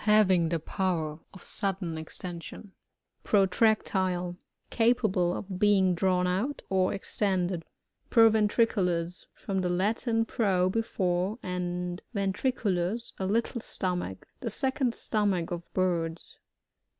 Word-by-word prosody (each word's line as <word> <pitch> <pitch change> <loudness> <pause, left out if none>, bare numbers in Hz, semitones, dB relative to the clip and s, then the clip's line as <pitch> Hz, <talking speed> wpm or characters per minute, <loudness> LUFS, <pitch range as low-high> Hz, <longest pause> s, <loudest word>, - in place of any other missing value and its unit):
Having 190 -6 +5
the 170 - +1
power 165 -3 -2
of 190 - -13
sudden' 195 -5 -2
extension. 170 +4 -7 0.5
Protractile. 190 -3 +2 0.2
— - - -48
Capable 215 -7 +3
of 185 -2 -6
being 195 -3 +4
drawn 180 0 +2
out, 200 +11 -1
or 185 -1 +3
extended. 190 -3 0 0.5
Provbntricdlus. 210 -6 +3
— - - -49
From, 195 -1 0
the 180 - 0
Latiot 225 +5 +1
pro, 190 -6 +2
before, 190 -2 0
and 180 0 -3
ventriculua, 200 0 -1
a 190 - -1
little 230 +3 0
stomach. 180 - -3
The 240 - -3
second 265 +2 0
stomach 200 -6 0
of 170 -1 -6
birds. 170 -3 -2
190 Hz, 115 wpm, -29 LUFS, 180-215 Hz, 0.5 s, Having